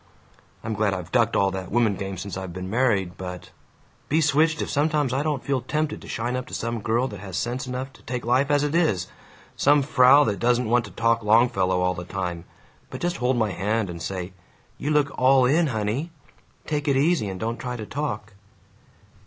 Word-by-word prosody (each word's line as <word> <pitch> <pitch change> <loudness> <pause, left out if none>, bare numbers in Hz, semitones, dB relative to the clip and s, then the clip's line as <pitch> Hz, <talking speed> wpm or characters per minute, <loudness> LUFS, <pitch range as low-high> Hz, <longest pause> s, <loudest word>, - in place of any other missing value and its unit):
I'm 110 - -3
glad 105 -2 +1
I've 90 -1 -7
ducked 115 -2 +2
all 100 -1 +3
that 95 -1 -5
woman 115 -2 +2
game 95 0 -5
since 95 0 -6
I've 95 -1 -5
been 90 +2 -6
married 105 -7 +1
but 90 -1 -7 0.6
Be 155 - +3
switched 160 +1 +3
if - - -2
sometimes 150 -3 +1
I 135 - +1
don't 150 -3 -2
feel 135 -2 0
tempted 150 +4 -2
to - - -12
shine 120 +2 -2
up 125 0 -4
to - - -6
some 115 -1 -3
girl 115 +5 +1
that 105 -4 -8
has 95 -2 -6
sense 125 +2 -2
enough 130 +1 -5
to - - -18
take 120 0 -5
life 130 +4 +2
as 145 0 +3
it 145 0 -1
is; 155 - +2 0.5
some 145 0 +4
frau 135 0 +6
that 105 -7 -1
doesn't 120 0 +2
want 120 +1 +2
to - - -11
talk 115 0 +1
Longfellow 105 -4 +3
all 90 0 +2
the 90 0 -6
time, 90 -2 -4 0.4
but - - -7
just 175 0 -1
hold 125 +1 +1
my 110 -3 +1
hand 100 +2 -1
and 85 -1 -8
say, 95 0 -4 0.5
'You 145 - -2
look 150 -2 +2
all 130 0 +5
in, 155 +6 +3
honey. 115 +6 -2 0.6
Take 150 -2 -2
it 140 -2 +3
easy, 145 - +2
and 95 -1 -6
don't 115 +4 -2
try 125 -1 -4
to 110 -3 -6
talk.' 105 -6 -4
120 Hz, 210 wpm, -24 LUFS, 100-140 Hz, 0.6 s, frau